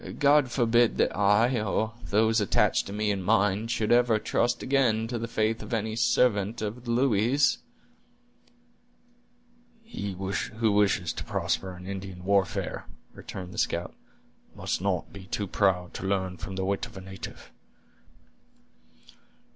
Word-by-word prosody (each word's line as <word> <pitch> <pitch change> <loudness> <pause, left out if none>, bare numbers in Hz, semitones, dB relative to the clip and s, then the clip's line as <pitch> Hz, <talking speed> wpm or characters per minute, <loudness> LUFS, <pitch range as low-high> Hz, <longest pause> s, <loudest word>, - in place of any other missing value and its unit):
God 145 -2 +4
forbid 120 -1 +2
that - - +1
I, 105 +4 +3
or 110 +1 -1
those 110 +2 +2
attached 100 - +2
to - - -7
me 105 +1 0
and 100 -2 -2
mine, 105 +1 +2
should 110 -2 -1
ever 120 -2 +4
trust 120 +2 0
again 120 -5 +2
to 120 -1 -3
the 115 - -3
faith 110 0 0
of 120 - -3
any 110 0 -2
servant 115 -2 +2
of 110 +3 -5
the - - -6
Louis's!" 120 +2 +2 2.2
"He 100 - -5
who 105 +4 -1
wishes 100 -4 +2
to - - -6
prosper 95 -1 -2
in 90 - -11
Indian 95 -2 -7
warfare," 100 -1 0 0.3
returned 90 -1 -8
the - - -4
scout, - - -1 0.6
"must - - -2
not 95 -2 -2
be 100 -2 -10
too 100 - -2
proud 90 -2 0
to 95 - -5
learn 95 -2 -1
from 95 +3 -7
the 95 0 -2
wit 100 0 -1
of - - -13
a - - -7
native. 95 -2 -9
105 Hz, 145 wpm, -27 LUFS, 95-115 Hz, 2.2 s, God